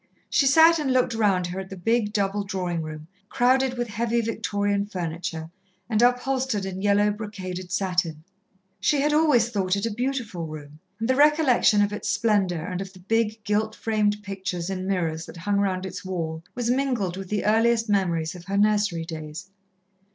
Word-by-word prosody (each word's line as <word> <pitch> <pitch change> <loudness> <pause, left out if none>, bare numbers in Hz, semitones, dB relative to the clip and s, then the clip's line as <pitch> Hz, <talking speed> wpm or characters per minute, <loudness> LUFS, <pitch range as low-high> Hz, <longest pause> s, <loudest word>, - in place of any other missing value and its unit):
She 275 - +4
sat 320 +4 +6
and 285 -3 0
looked 255 -2 +2
round 200 -5 +2
her 175 +2 -4
at 190 0 -7
the 195 - -8
big, 220 +3 +1
double 205 0 0
drawing 180 -3 -2
room, 155 0 -7 0.2
crowded 260 0 +2
with 240 0 -1
heavy 230 +2 0
Victorian 205 -2 -1
furniture, 165 -3 -4 0.4
and 215 0 +1
upholstered 250 -3 +1
in 190 0 -5
yellow, 205 +1 +3
brocaded 185 -4 -6
satin. 180 -4 -1 0.6
She 295 - +2
had 295 +1 +2
always 295 -7 +4
thought 195 -4 0
it 200 - -2
a 230 - -1
beautiful 235 -7 -3
room, 150 -1 -10 0.2
and 225 - -1
the 260 - +2
recollection 285 -7 +4
of 205 0 -1
its 210 - -4
splendour 190 -5 +1
and 180 +1 -4
of 190 -1 -7
the 185 - -14
big, 220 +2 -1
gilt 215 +1 0
framed 210 -2 0
pictures 190 -3 -4
and 185 0 -4
mirrors 165 -4 -1
that - - -10
hung 200 +4 -1
round 190 -2 0
its 190 - -6
wall, 165 -4 -4
was 245 -1 0
mingled 250 -9 0
with 190 -1 -7
the 210 -1 -1
earliest 225 +2 +3
memories 170 -6 0
of 175 -1 -11
her 195 +1 -2
nursery 205 -5 +2
days. 160 +3 -8
205 Hz, 180 wpm, -25 LUFS, 180-230 Hz, 0.6 s, sat